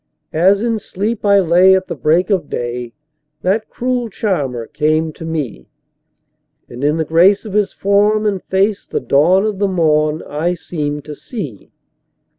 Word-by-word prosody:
As 190 +6 +3
in 230 -2 0
sleep 210 +3 -4
I 200 -1 +5
lay 180 +1 +5
at 190 0 0
the - - -5
break 170 +6 +1
of 185 -7 0
day 120 0 -4 0.5
that 205 +4 0
cruel 250 -1 -2
charmer 140 - -2
came 155 +5 0
to 165 - -10
me, 145 - -4 1.0
And 120 +3 -8
in 150 +2 +2
the 160 - -1
grace 180 +7 +4
of 210 - -7
his 210 -1 +1
form 205 +2 +2
and 200 -3 0
face 195 +2 0
the - - -2
dawn 175 +8 +3
of 210 -3 -2
the 200 - +2
morn 155 -4 +1
I 165 +5 -2
seemed 150 -4 -4
to 150 - -7
see. 150 - -8
180 Hz, 165 wpm, -17 LUFS, 150-200 Hz, 1.0 s, I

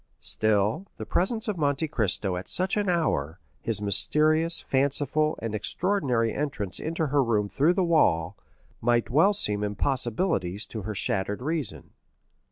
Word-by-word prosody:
Still, 110 - +2
the - - -6
presence 220 +6 -1
of 205 -5 -3
Monte 145 +1 0
Cristo 100 - 0
at 90 - -6
such 185 +1 +1
an 205 -2 0
hour, 90 - -1 0.2
his 105 -3 -1
mysterious, 155 - +3
fanciful, 145 +3 +1
and 115 -2 -3
extraordinary 125 - 0
entrance 135 -10 -4
into 160 +1 -2
her 145 -1 +1
room 105 -4 0
through 140 - +2
the 190 - +1
wall, 95 - +2 0.5
might 120 0 +1
well 165 +10 +4
seem 105 - 0
impossibilities 110 - -1
to 110 - -7
her 105 +2 -5
shattered 105 0 -2
reason. 155 -4 -4
130 Hz, 145 wpm, -26 LUFS, 105-160 Hz, 0.5 s, well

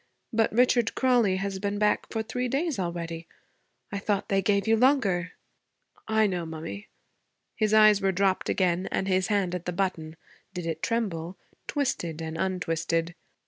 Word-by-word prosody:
But 225 0 +2
Richard 240 0 +3
Crawley 245 -7 +3
has 195 0 -3
been 200 +1 -2
back 210 0 +1
for 220 -1 -1
three 250 +3 -2
days 280 - -1
already. 170 -2 -4 0.6
I 200 - -3
thought 200 -1 -1
they 195 -1 +2
gave 200 +2 +1
you 225 - +5
longer?' 210 -8 +2 0.7
'I 220 0 +3
know, 180 -4 -1
mummy.' 165 +6 -7 0.7
His 215 -2 +1
eyes 215 -1 +6
were 195 0 +2
dropped 190 0 +1
again 185 -1 +1
and 190 - -1
his 185 -1 +1
hand 200 -4 0
at 180 -1 -4
the 180 - -2
button 170 -4 -2 0.4
did 175 -1 -4
it 160 -1 -3
tremble? 185 -7 -2 0.3
twisted 250 - -2
and 160 0 -5
untwisted. 165 -2 -1
195 Hz, 160 wpm, -27 LUFS, 170-220 Hz, 0.7 s, eyes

